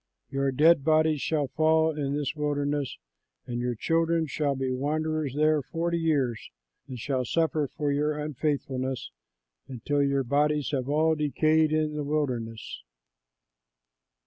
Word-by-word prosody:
Your 135 0 0
dead 150 +2 +5
bodies 155 -1 +3
shall 150 -4 0
fall 160 +1 +2
in 140 -2 -2
this 145 -2 -2
wilderness, 145 -2 -1 0.5
and 120 -1 -4
your 125 0 -1
children 165 +5 +1
shall 145 -1 -1
be 130 -1 -2
wanderers 150 +1 -1
there 155 0 +3
forty 170 +4 -2
years 140 -8 0 0.4
and 130 -2 -7
shall 130 +2 -1
suffer 155 +3 0
for 145 -1 0
your 150 +1 0
unfaithfulness 140 - -2 0.6
until 135 +3 -1
your 140 -1 +1
bodies 145 +3 +1
have 135 -2 -2
all 155 +2 +3
decayed 155 +1 +2
in 155 -1 +1
the 150 0 -3
wilderness." 125 -7 -3
145 Hz, 135 wpm, -27 LUFS, 135-155 Hz, 0.6 s, dead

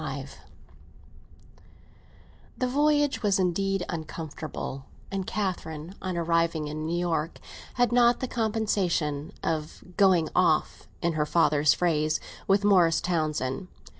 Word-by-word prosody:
XXV - - -5 2.2
THE 255 - 0
voyage 290 +2 +2
was 205 -3 +2
indeed 195 0 0
uncomfortable, 155 -4 -6 0.3
and 195 -1 -3
Catherine, 175 -5 -3
on 185 -2 -3
arriving 165 -2 +1
in 155 +1 -4
New 170 +1 -1
York, 165 -2 -1 0.4
had 245 -2 +2
not 240 0 +4
the 255 - -2
compensation 200 - -1
of 155 -1 -3
"going 185 -5 +4
off," 170 -4 +2 0.2
in 170 0 +1
her 150 -1 0
father's 150 -3 +3
phrase, 155 -3 +1 0.3
with 195 +1 +3
Morris 180 -5 +4
Townsend. 155 -2 -1
170 Hz, 115 wpm, -27 LUFS, 155-195 Hz, 2.2 s, not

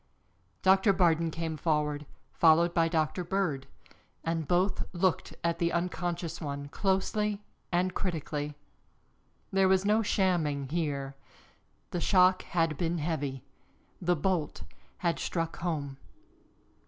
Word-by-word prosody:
Doctor 190 +1 +5
Bardon 170 -2 +3
came 160 0 -4
forward, 150 -2 0 0.3
followed 170 +1 +5
by 165 -1 +3
Doctor 160 +2 0
Bird, 175 -7 -1 0.6
and 165 -2 -1
both 180 +3 +1
looked 180 0 0
at 170 0 0
the 170 0 +1
unconscious 175 -1 -2
one 140 -2 -4
closely 205 +3 0 0.3
and 180 +1 +1
critically. 150 -5 -3 1.0
There 195 0 +4
was 190 +1 +3
no 215 +2 +4
shamming 165 -10 +1
here 140 -4 -2 0.8
the 175 - -2
shock 185 0 +5
had 165 -4 0
been 170 0 0
heavy 145 -5 -2 0.6
the 175 0 +2
bolt 160 - -1 0.3
had 170 -2 0
struck 165 -1 -2
home. 150 -6 -3
170 Hz, 115 wpm, -30 LUFS, 150-185 Hz, 1.0 s, Doctor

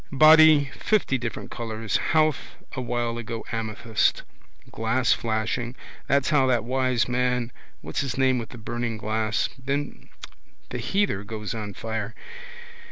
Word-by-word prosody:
Body 155 -1 +7
fifty 190 -11 +1
different 115 -2 -5
colours. 110 -2 -2
Howth 155 -2 +1 0.2
a 130 - -4
while 120 -1 -2
ago 115 -1 -5
amethyst. 110 -1 0 0.5
Glass 115 +2 +2
flashing. 115 +2 -2 0.3
That's 140 +3 +2
how 135 -3 +4
that 120 -3 +2
wise 130 -1 +1
man 125 -1 0 0.3
what's 80 +1 -3
his 135 -3 -3
name 130 -1 +3
with 115 - -6
the 125 - -10
burning 120 0 -3
glass. 110 0 0
Then 140 +2 -3 0.6
the - - -4
heather 195 - 0
goes 105 0 -5
on 105 -3 -5
fire. 110 0 -4
120 Hz, 135 wpm, -25 LUFS, 110-130 Hz, 0.6 s, Body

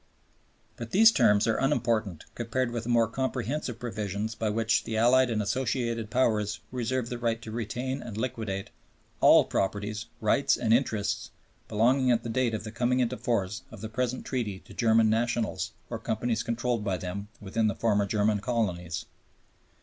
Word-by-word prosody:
But 115 -1 -6
these 220 - +7
terms 105 - +4
are 115 - +1
unimportant 115 - 0
compared 120 +1 -1
with 115 -1 -4
the - - -4
more 115 -1 +4
comprehensive 130 +1 -2
provision 105 -3 -3
by 110 - 0
which 110 +1 +1
"the 110 - -3
Allied 125 +3 +5
and 110 -2 0
Associated 115 0 -1
Powers 110 -4 +1
reserve 125 0 -2
the 120 - -4
right 115 -1 0
to 110 - -7
retain 125 +4 -3
and 110 -3 -7
liquidate 110 -5 -3 0.5
all - - +7
property, 105 +2 -1 0.3
rights, 135 +6 +2
and 115 -2 +2
interests 110 -5 0 0.4
belonging 125 +5 +3
at 120 -1 +3
the 120 - -4
date 120 -1 +1
of 105 - -5
the 110 - -6
coming 125 +3 +1
into 125 0 +1
force 105 -6 -1
of - - -11
the 110 - -5
present 125 +2 -2
Treaty 115 -7 -2
to - - -15
German 115 -1 +4
nationals, 115 +1 0 0.2
or - - -5
companies 115 +1 -1
controlled 120 -1 -1
by 95 -3 -1
them," 95 +4 -5
within 110 +2 0
the 105 - 0
former 105 -3 +1
German 105 0 +1
colonies. 90 -8 -2
115 Hz, 170 wpm, -28 LUFS, 105-125 Hz, 0.5 s, these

